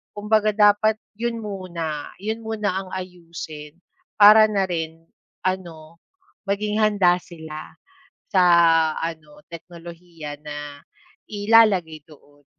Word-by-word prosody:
kumbaga 215 Hz, +1 st, +1 dB
dapat 210 Hz, +1 st, +4 dB, 0.2 s
yun 235 Hz, 0 st, -2 dB
muna 170 Hz, -7 st, -5 dB
yun 220 Hz, +3 st, -4 dB
muna 210 Hz, -4 st, -2 dB
ang 190 Hz, -1 st, -9 dB
ayusin 170 Hz, -4 st, -9 dB, 0.4 s
para 215 Hz, +1 st, +8 dB
na 200 Hz, -2 st, 0 dB
rin 165 Hz, -2 st, -5 dB, 0.4 s
ano, 170 Hz, -3 st, -5 dB, 0.5 s
maging 210 Hz, +2 st, -1 dB
handa 200 Hz, -4 st, +3 dB
sila 160 Hz, -2 st, -10 dB, 0.6 s
sa 190 Hz, -2 st, +3 dB, 0.6 s
ano 160 Hz, 0 st, -7 dB
teknolohiya 170 Hz, -2 st, -10 dB
na 145 Hz, -1 st, -7 dB, 0.5 s
ilalagay 205 Hz, -7 st, +2 dB
doon. 145 Hz, -2 st, -21 dB
180 Hz, 100 wpm, -22 LUFS, 160-210 Hz, 0.6 s, para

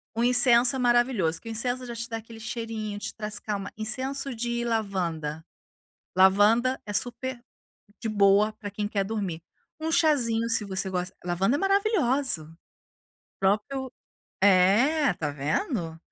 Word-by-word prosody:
Um 230 Hz, -, 0 dB
incenso 245 Hz, 0 st, +5 dB
é 265 Hz, -, -2 dB
maravilhoso, 240 Hz, -9 st, +2 dB
que -, -, -13 dB
o -, -, -4 dB
incenso 245 Hz, +3 st, -1 dB
já 235 Hz, -1 st, -6 dB
te 235 Hz, +2 st, -5 dB
dá 225 Hz, -, -3 dB
aquele 225 Hz, 0 st, -11 dB
cheirinho, 220 Hz, -2 st, -5 dB
te -, -, -5 dB
traz 210 Hz, -1 st, -4 dB
calma. 200 Hz, -2 st, -4 dB
Incenso 260 Hz, +5 st, -3 dB
de 235 Hz, +1 st, -2 dB
lavanda, 175 Hz, -9 st, -2 dB, 0.7 s
lavanda 205 Hz, +7 st, +4 dB
é 205 Hz, -, -5 dB
super 245 Hz, +3 st, -3 dB, 0.6 s
de 225 Hz, -, -4 dB
boa 205 Hz, +1 st, +4 dB
pra 210 Hz, -1 st, -8 dB
quem 205 Hz, +1 st, -3 dB
quer 205 Hz, -1 st, -1 dB
dormir. 195 Hz, -6 st, -4 dB, 0.4 s
Um 320 Hz, +1 st, -2 dB
chazinho 255 Hz, -9 st, +2 dB
se 225 Hz, -2 st, +1 dB
você 190 Hz, -1 st, -3 dB
gosta 180 Hz, -1 st, -3 dB
lavanda 190 Hz, +8 st, +1 dB
é 290 Hz, -, -1 dB
maravilhosa, 330 Hz, -, +1 dB
o 160 Hz, +1 st, -16 dB, 0.9 s
próprio 240 Hz, +7 st, 0 dB, 0.5 s
é, 205 Hz, +10 st, +4 dB
tá 155 Hz, -4 st, -3 dB
vendo, 160 Hz, -, -2 dB
225 Hz, 150 wpm, -26 LUFS, 195-250 Hz, 0.9 s, incenso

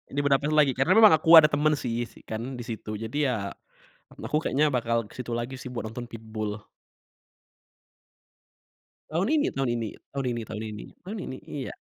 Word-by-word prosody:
di -, -, +1 dB
Budapest 140 Hz, +1 st, +2 dB
lagi 150 Hz, -3 st, +5 dB
karena 135 Hz, +1 st, +1 dB
memang 220 Hz, -4 st, +9 dB
aku 165 Hz, +2 st, +7 dB
ada 150 Hz, -, +6 dB
temen 150 Hz, +1 st, +2 dB
sih 120 Hz, -1 st, -2 dB
si -, -, -17 dB
kan 120 Hz, +4 st, -5 dB
di -, -, -5 dB
situ 110 Hz, -2 st, -5 dB
jadi 115 Hz, +6 st, -5 dB
ya, 125 Hz, -, 0 dB, 0.9 s
aku 150 Hz, -, 0 dB
kayaknya 150 Hz, +3 st, +2 dB
bakal 115 Hz, -3 st, 0 dB
ke -, -, -15 dB
situ 120 Hz, -1 st, -5 dB
lagi 120 Hz, +3 st, -4 dB
sih 130 Hz, -, -8 dB
buat 120 Hz, -2 st, -4 dB
nonton 120 Hz, +2 st, -6 dB
Pitbull. 110 Hz, -2 st, -6 dB, 2.4 s
Tahun 170 Hz, +6 st, 0 dB
ini 305 Hz, -1 st, +2 dB
tahun 135 Hz, -2 st, -2 dB
ini 115 Hz, -2 st, -3 dB, 0.2 s
tahun 140 Hz, -1 st, -2 dB
ini 115 Hz, -, -3 dB
tahun 110 Hz, 0 st, -6 dB
ini 105 Hz, -1 st, -7 dB, 0.2 s
tahun 200 Hz, +5 st, -7 dB
ini, 130 Hz, -, -6 dB
iya. 140 Hz, -3 st, -5 dB
125 Hz, 180 wpm, -27 LUFS, 115-150 Hz, 2.4 s, memang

